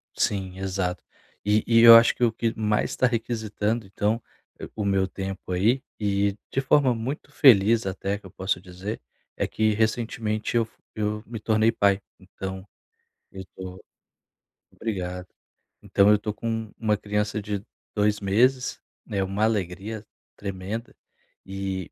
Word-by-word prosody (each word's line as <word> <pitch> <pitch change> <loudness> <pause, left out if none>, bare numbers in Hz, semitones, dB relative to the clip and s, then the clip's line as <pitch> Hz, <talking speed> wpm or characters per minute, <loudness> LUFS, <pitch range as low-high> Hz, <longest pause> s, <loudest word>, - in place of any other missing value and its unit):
Sim, 95 -2 -1
exato. 95 -1 -2 0.4
E 105 +1 +3
e 115 -1 +4
eu 115 0 +11
acho 115 0 +7
que 125 - -2
o 115 - +4
que 115 0 -1
mais 105 -1 0
tá 125 - +3
requisitando, 110 -2 -2
então, 105 +4 -1 0.5
o 105 - -2
meu 95 -1 +2
tempo 95 0 -6
aí, 110 +9 +2 0.2
e 100 0 +1
de 135 - +1
forma 135 -1 +4
muito 135 +5 -5
feliz 115 -6 +5
até 95 +1 -2
que - - -20
eu 95 - -11
posso 95 -1 -1
dizer, 90 - -6 0.4
é - - 0
que 110 -1 +1
recentemente 110 0 -1
eu 115 - +4
f - - -25 0.2
eu 105 0 -2
me 115 -1 -7
tornei 110 +1 +3
pai, 100 -3 +2 0.2
então 95 0 -7 0.7
eu 95 -1 -8
tô 95 0 -8 0.9
obrigado. 90 -4 -4 0.5
Então 100 +1 +4
eu 105 - +5
tô 105 0 -3
com 115 -1 -3
uma 110 -2 +1
criança 105 +1 -2
de 105 +1 -4 0.3
2 105 0 +2
meses, 125 +6 +2 0.3
né, 100 -2 -1
uma 100 +3 -1
alegria 105 +1 -2 0.3
tremenda. 100 +4 -5 0.5
E, 95 -2 -4
105 Hz, 150 wpm, -25 LUFS, 95-115 Hz, 0.9 s, eu